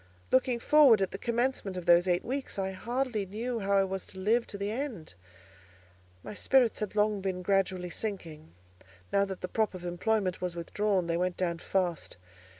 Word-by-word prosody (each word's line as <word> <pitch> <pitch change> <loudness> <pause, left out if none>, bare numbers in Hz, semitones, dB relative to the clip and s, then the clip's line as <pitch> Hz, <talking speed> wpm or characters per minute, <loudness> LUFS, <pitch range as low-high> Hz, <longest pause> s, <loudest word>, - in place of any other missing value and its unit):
Looking 255 -2 +3
forward 275 -4 +6
at 195 - 0
the 195 - -6
commencement 235 -5 -1
of 180 - -5
those 175 +1 +5
eight 175 -1 +1
weeks, 265 -1 -4
I 190 -1 -1
hardly 235 +3 -2
knew 230 +5 -3
how 200 -1 -1
I 195 - +4
was 190 0 -4
to - - -11
live 225 +5 +2
to 200 - -6
the 200 +1 -2
end. 230 - -5 1.1
My - - -7
spirits 245 +3 +2
had 210 -1 -4
long 210 -1 +2
been 185 -1 -3
gradually 185 -2 0
sinking; 170 - -6 0.6
now 200 0 +4
that 190 -2 -7
the 180 - -3
prop 215 0 0
of 180 -1 -8
employment 185 +1 -1
was 180 -1 -3
withdrawn, 190 +2 0
they 170 0 -1
went 180 0 -1
down 170 -2 -1
fast. 180 - -2
195 Hz, 185 wpm, -30 LUFS, 180-225 Hz, 1.1 s, forward